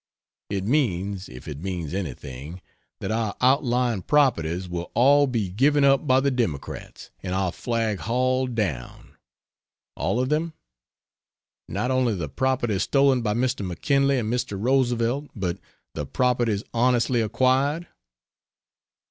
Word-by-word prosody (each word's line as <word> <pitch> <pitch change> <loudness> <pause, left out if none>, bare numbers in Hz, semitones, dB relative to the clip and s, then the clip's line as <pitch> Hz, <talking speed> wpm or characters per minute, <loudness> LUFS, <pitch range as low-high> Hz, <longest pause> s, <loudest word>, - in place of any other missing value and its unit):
It 95 -1 -2
means, 100 - 0
if 65 +3 -11
it 75 -2 -6
means 90 -4 -4
anything, 75 -2 -6 0.4
that - - -3
our 110 -2 -1
outlying 125 -4 +2
properties 90 - +1
will 90 0 -5
all 140 +4 +5
be 115 -6 -1
given 140 +9 +3
up 140 +2 +4
by 130 0 +5
the 140 +1 +1
Democrats, 110 - -4
and 95 -1 -3
our 95 -2 0
flag 115 -2 -2
hauled 130 +2 0
down. 80 - -4 0.8
All 120 - -1
of 130 +1 0
them? 160 +2 0 1.2
Not 125 - -1
only 125 -4 +2
the 85 -6 -4
properties 120 - 0
stolen 135 +1 +3
by 105 -2 0
Mr. 125 -2 0
McKinley 140 - +1
and 115 -1 -1
Mr. 120 -5 -2
Roosevelt, 125 +2 +1
but 90 -5 -2 0.3
the 75 - -4
properties 120 - +1
honestly 120 0 +2
acquired? 130 +8 +1
120 Hz, 130 wpm, -24 LUFS, 95-130 Hz, 1.2 s, all